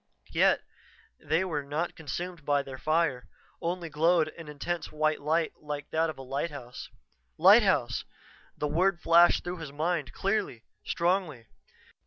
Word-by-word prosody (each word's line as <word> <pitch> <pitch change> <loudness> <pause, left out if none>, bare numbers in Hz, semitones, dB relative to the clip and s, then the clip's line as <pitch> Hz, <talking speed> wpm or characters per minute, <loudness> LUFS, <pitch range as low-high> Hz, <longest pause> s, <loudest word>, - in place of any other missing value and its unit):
Yet, - - +3 0.6
they 165 +4 0
were 155 -5 -2
not 150 +5 -3
consumed 165 +2 -6
by 145 -1 +1
their 130 -1 -9
fire, 155 -4 0 0.3
only 175 0 -2
glowed 160 +1 +2
an 165 0 -11
intense 150 +4 -4
white 155 0 0
light 160 +2 0
like 150 -1 -6
that 160 +1 +1
of 155 - -6
a 135 - -8
lighthouse. 135 -2 -5 0.5
"Lighthouse!" - - +5 0.5
The 150 - -1
word 175 +4 +2
flashed 170 +1 +5
through 175 +1 -4
his 160 -4 -7
mind 155 -2 -1
clearly, 195 - -2 0.2
strongly. 170 -8 -1
155 Hz, 140 wpm, -29 LUFS, 145-170 Hz, 0.6 s, Lighthouse